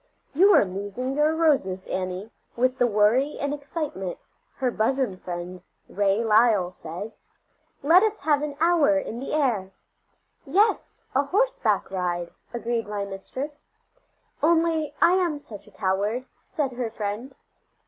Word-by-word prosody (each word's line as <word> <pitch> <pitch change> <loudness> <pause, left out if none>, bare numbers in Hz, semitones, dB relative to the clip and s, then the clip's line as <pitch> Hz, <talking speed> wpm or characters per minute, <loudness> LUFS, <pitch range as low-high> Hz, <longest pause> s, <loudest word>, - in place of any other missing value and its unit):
"You 380 +8 +6
are - - +6
losing 205 +7 -4
your 300 +2 +2
roses, 265 - +1
Annie, 185 +3 -4 0.2
with 255 +2 +1
the 245 - +4
worry 230 +7 +2
and 285 0 -1
excitement," 285 - -4 0.4
her 255 -2 0
bosom 235 -1 0
friend, 180 0 -7 0.3
Ray 200 +2 +1
Lyle, 215 -4 +4
said; 180 +5 -7 0.7
"let 335 +6 +7
us 435 0 0
have 295 -1 +2
an 295 -1 -4
hour 325 -3 +4
in 240 -5 -4
the 270 - -5
air." 235 -11 +1 0.7
"Yes, 400 +10 +1
a 275 +2 +2
horseback - - +1
ride," 175 -2 -2 0.2
agreed 235 -1 -2
my 205 -1 -3
mistress. 260 +10 -6 0.8
"Only 320 -1 +2
I 340 - +7
am 345 -5 0
such 215 -8 -12
a - - -16
coward," 205 +6 -1 0.2
said 290 -6 -2
her 245 -2 -3
friend. 220 +5 -5
245 Hz, 140 wpm, -25 LUFS, 200-295 Hz, 0.8 s, let